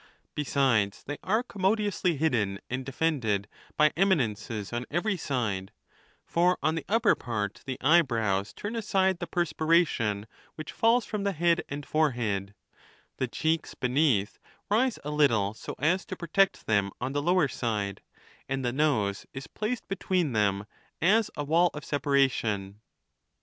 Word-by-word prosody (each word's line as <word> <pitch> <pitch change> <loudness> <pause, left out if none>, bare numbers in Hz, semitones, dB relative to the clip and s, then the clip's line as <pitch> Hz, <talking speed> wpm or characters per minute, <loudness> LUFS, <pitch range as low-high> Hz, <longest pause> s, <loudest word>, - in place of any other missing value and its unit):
Besides, 130 -8 +1
they 145 +1 -6
are 220 +5 +1
commodiously 200 - 0
hidden 115 -10 0
and 130 +1 -2
defended 125 -8 -1 0.3
by 150 0 +4
eminences 115 - 0
on 120 +1 -3
every 195 +6 0
side; 115 - -2 0.5
for 175 +2 +2
on 155 +2 +2
the 165 - -3
upper 225 0 +4
part 105 -4 -4
the 130 -1 -3
eyebrows 115 - +2
turn 210 +3 -6
aside 190 -4 +1
the 175 - -4
perspii'ation 155 - +1 0.3
which 155 0 -7
fall's 230 +1 +3
from 210 -2 -3
the 200 -1 0
head 170 0 +2
and 145 0 -5
foi 155 0 +2
ehead; 100 -4 -3 0.6
the 130 - -1
cheeks 160 +6 -1
beneath 125 -5 +1 0.3
rise 240 +3 +2
a 150 - -4
little, 115 -9 +2
so - - -8
as 175 +6 +1
to - - -5
protect 190 +3 +1
them 100 -2 +2
on 135 - -3
the 145 - 0
lower 175 0 +3
side; 105 -6 -3 0.5
and 135 -1 -2
the 120 - 0
nose 115 -9 0
is 135 0 -6
placed 225 +3 -4
between 185 -6 0
them 100 -2 +1 0.3
as 210 +6 +3
a 145 - -2
wnll 170 +4 +4
of 150 - -7
separation. 115 -9 0
145 Hz, 150 wpm, -28 LUFS, 110-175 Hz, 0.6 s, by